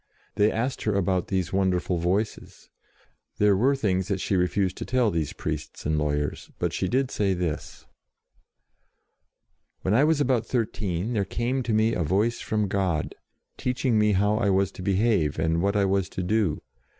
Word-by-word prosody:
They 105 +1 +3
asked 125 +4 -2
her 105 -2 0
about 95 -2 0
these 95 -2 -2
wonder 95 -2 +2
ful 90 -1 -2
Voices. 95 +6 -3 0.7
There 105 -1 +4
were 130 +8 +3
things 95 -7 0
that 100 -2 -1
she 95 - -1
refused 90 +1 +1
to - - -4
tell 125 -4 +2
these 80 -3 -1
priests - - -5
and 75 +1 +1
lawyers, 75 -1 -2
but - - -1
she - - -1
did 130 +1 0
say 100 -2 +1
this: 85 -4 -4 2.0
"When 95 - +1
I 125 +6 +5
was 155 0 +3
about 125 -5 +1
thirteen 105 -4 -2
there 105 -3 +1
came 120 +6 -1
to 120 - -3
me 110 +1 +3
a - - -1
Voice 100 +9 +1
from 105 -1 -1
God, 95 -5 -1 0.4
teaching 125 -3 0
me 105 0 +3
how 105 +2 +2
I 105 -3 +1
was 95 0 +2
to 95 - -10
behave 95 - +1
and 80 +1 +1
what 100 +2 +1
I 100 -1 +3
was 95 -1 0
to 90 - 0
do. 100 -4 0
100 Hz, 180 wpm, -26 LUFS, 90-110 Hz, 2.0 s, I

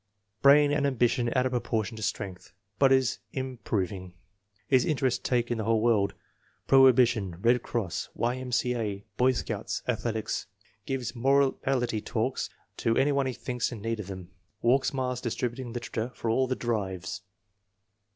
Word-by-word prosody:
" 105 +2 -50
Brain 145 +1 +6
and 145 -1 +2
ambition 120 -2 +1
out 130 0 +3
of 130 - 0
proportion 115 -2 -1
to 110 - -8
strength, 100 -4 -4 0.3
but 135 -1 +5
is 130 -2 +3 0.2
improv 125 -8 -2
ing. 95 -2 -8 0.5
His 130 -3 +4
interests 130 -5 +1
take 120 -1 0
in 120 - -1
the - - -1
whole 110 +1 +2
world; 105 -4 +2 0.5
prohi 135 -1 +8
bition, 115 -8 +1
Bed 120 +4 +3
Cross, 90 -10 -3
Y.M.C.A., 120 -4 -1
Boy 130 +1 +4
Scouts, - - -3
Athletics. 110 -2 -2 0.4
Gives 125 -4 -3
morality 135 -2 +1
talks - - -2 0.3
to 115 - +1
any 145 +2 +3
one 140 -1 +1
he 130 - -2
thinks 125 0 -3
in 120 - -6
need 115 -1 -2
of 100 - -6
them. 95 -2 -8 0.3
Walks 130 +3 +3
miles 125 -2 -2
distributing 120 +1 -3
literature 120 -1 -3
for 115 - -1
all 130 +3 +2
the 130 - -1
'drives.'" 100 -5 -3
120 Hz, 160 wpm, -28 LUFS, 110-130 Hz, 0.5 s, prohi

